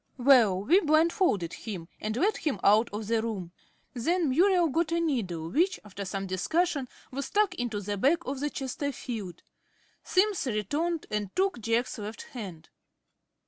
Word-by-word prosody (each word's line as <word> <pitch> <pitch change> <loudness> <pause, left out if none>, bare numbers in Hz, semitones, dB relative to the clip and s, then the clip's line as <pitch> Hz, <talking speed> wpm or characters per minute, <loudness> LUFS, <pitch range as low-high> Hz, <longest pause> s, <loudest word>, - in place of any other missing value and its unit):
Well, 240 -8 +5
we 345 - +5
blindfolded 310 - +2
him, 190 -7 -6
and 215 +2 -3
led 405 +9 +2
him 280 - -2
out 215 +3 +5
of 210 +1 -4
the 225 +1 +1
room. 200 -7 -4 0.4
Then 320 +6 +1
Muriel 355 +3 +4
got 325 +3 0
a 335 - +2
needle, 190 - -2
which, 350 - +2
after 200 -1 -7
some 195 +1 -3
discussion, 280 - 0 0.2
was 275 +1 -4
stuck 415 -2 +2
into 240 - -3
the 205 +1 -3
back 330 - +2
of 270 +1 -3
the 295 +1 -1
Chesterfield. 245 - -5 0.6
Simms 390 -5 +1
returned 290 - -1
and 210 -2 -1
took 380 -7 +1
Jack's 230 +2 0
left 210 +2 -6
hand. 190 -10 -9
250 Hz, 155 wpm, -28 LUFS, 205-330 Hz, 0.6 s, Well